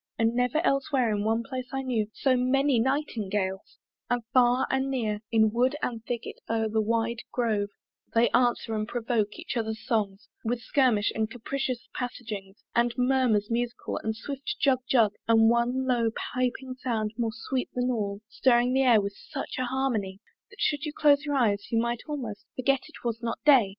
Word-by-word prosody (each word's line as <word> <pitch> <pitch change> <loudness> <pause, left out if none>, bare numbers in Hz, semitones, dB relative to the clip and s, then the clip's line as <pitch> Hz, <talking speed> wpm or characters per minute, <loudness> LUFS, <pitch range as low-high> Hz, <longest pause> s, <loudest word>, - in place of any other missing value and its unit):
But 225 0 +3
never 250 +7 +1
elsewhere 275 -3 +2
in 205 - -1
one 225 +2 +1
place 255 0 -5
I 270 0 -2
knew 235 -5 0
So 265 -2 +2
many 260 +1 +2
Nightingales: 210 -8 -1 0.3
and 245 -1 0
far 250 0 +4
and 265 0 +1
near 220 -6 -1
In 220 -1 +4
wood 250 +5 +2
and 230 -2 -2
thicket 235 0 -5
over 225 -1 +1
the 220 0 +1
wide 230 +1 0
grove 215 -4 0 0.5
They 230 +1 +4
answer 240 -2 +2
and 215 0 -1
provoke 225 -3 -1
each 335 -3 -5
other's 220 -1 -3
songs 210 -4 -1 0.2
With 235 +1 -1
skirmish 235 -3 +2
and 220 -1 -1
capricious 255 +1 -3
passagings, 215 -6 -6
And 235 0 +2
murmurs 250 -5 +2
musical 240 +1 -2
and 220 0 -2
swift 275 +4 -5
jug 270 -3 +3
jug 225 -5 +4
And 225 0 +6
one 245 +2 +1
low 240 -3 +2 0.2
piping 255 +1 -1
sound 220 -4 -1
more 235 -1 0
sweet 250 +3 -3
than 250 0 +1
all 205 -3 -2
Stirring 245 +1 +3
the 265 - +3
air 245 -4 +6
with 200 0 -3
such - - -7
an 255 - 0
harmony, 240 -7 -1 0.3
That 405 - -17
should 300 -9 +1
you 300 - -3
close 290 -1 +4
your 290 -1 -1
eyes, 205 -6 +1
you 230 - +2
might 235 0 -1
almost 250 -9 -5
Forget 270 +1 +2
it 315 - -14
was 230 -1 -2
not 230 -1 -2
day! 265 -9 +6
240 Hz, 180 wpm, -27 LUFS, 220-260 Hz, 0.5 s, And